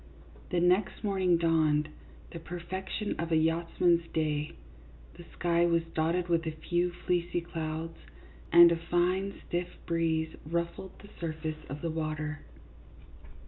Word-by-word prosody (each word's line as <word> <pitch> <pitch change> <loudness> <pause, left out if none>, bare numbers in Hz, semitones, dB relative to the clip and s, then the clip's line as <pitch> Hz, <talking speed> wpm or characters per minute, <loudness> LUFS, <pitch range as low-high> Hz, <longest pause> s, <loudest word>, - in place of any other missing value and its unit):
The 180 - +1
next 180 +5 +2
morning 190 -4 +2
dawned, 155 -2 +2 0.4
the 170 - -6
perfection 180 +5 -4
of 170 +1 -2
a - - +4
yachtsman's 170 +1 +2
day. 150 -1 -1 0.6
The 175 - -12
sky 170 0 +2
was 170 -1 +2
dotted 170 +3 +1
with 165 -1 +1
a - - 0 0.2
few 175 0 +2
fleecy 175 -1 +1
clouds, 165 -1 -5 0.5
and 170 0 +9
a - - +3
fine 185 +3 +1
stiff 175 +1 -1 0.2
breeze 160 -1 0
ruffled 170 +3 -3
the 205 - -12
sur 165 -2 -2
face 155 0 -5
of 145 +2 -6
the 165 - -1
water. 155 -1 -3
170 Hz, 140 wpm, -30 LUFS, 160-175 Hz, 0.6 s, and